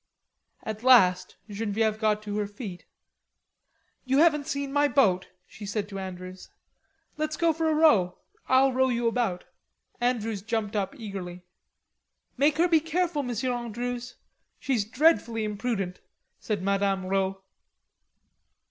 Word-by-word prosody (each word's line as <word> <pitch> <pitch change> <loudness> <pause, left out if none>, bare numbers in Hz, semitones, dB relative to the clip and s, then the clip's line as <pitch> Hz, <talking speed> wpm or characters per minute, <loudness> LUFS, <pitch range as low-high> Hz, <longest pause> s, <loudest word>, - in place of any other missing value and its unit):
At 215 0 -5
last 230 -8 +5
Genevieve 215 +1 -1
got 215 -1 +1
to 210 0 -3
her 205 - -1
feet. 205 -3 -9 1.2
"You 265 +1 +1
haven't 300 -2 +4
seen 280 -2 -3
my 290 0 +4
boat," 210 -10 +2 0.2
she 215 - -13
said 205 0 -3
to 195 -1 -6
Andrews. 185 0 -8 0.7
"Let's 310 0 -2
go 335 -1 +3
for 320 0 0
a 310 - +2
row. 220 - +4 0.3
I'll 260 0 +4
row 260 +1 +2
you 240 -1 -1
about." 230 -6 -1 0.6
Andrews 225 -4 -1
jumped 220 -1 -2
up 205 +7 -2
eagerly. 185 -5 -7 0.9
"Make 290 +3 +2
her 345 +2 +4
be 330 -2 +4
careful, 330 0 -1
Monsieur 250 -1 -2
Andrews, 240 +1 -4 0.4
she's 240 -7 -1
dreadfully 235 -3 +2
imprudent,'" 205 -3 -3 0.4
said 205 -4 -3
Madame 195 -1 0
Rod. 190 0 0
225 Hz, 130 wpm, -27 LUFS, 200-270 Hz, 1.2 s, last